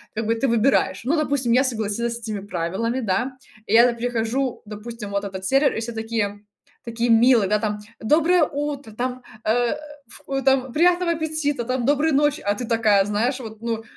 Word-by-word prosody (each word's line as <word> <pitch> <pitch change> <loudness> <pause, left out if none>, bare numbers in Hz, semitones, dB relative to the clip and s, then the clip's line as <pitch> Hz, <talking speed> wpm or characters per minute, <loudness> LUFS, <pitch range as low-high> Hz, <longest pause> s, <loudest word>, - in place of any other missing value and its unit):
как 225 - -2
бы 225 +1 +1
ты 270 +4 0
выбираешь. 235 +3 +2
Ну, 285 +7 +1
допустим, 280 -6 0
я 255 +3 +5
согласилась 235 -1 -2
с - - -7
этими 220 -3 -4
правилами, 195 +7 -2
да, 240 +6 -1 0.3
я 230 +3 +6
там 235 - -1
прихожу, 245 +2 -2
допустим, 210 0 -8
в 200 - -5
этот 190 -1 -3
сервер, 275 +6 +3
и - - -2
все 230 +1 -4
такие, 220 -2 -3 0.4
такие 235 0 -2
милые, 230 -3 +5
там: 210 -1 -2 0.2
"Доброе 320 +8 +3
утро", 285 -4 -3
там, 250 +3 -4 0.2
э, 235 +2 +2 0.4
ф 270 +3 -5
там: 265 -2 +2
"Приятного 350 +1 +3
аппетита", 310 -5 -2
там: 255 0 -2
"Доброй 290 +3 +2
ночи". 295 +1 +2
А 205 0 0
ты 245 +3 -5
такая, 215 -4 +3
знаешь, 225 +6 0
вот, 220 -3 -9
ну, 230 -1 -3
235 Hz, 180 wpm, -22 LUFS, 220-270 Hz, 0.4 s, я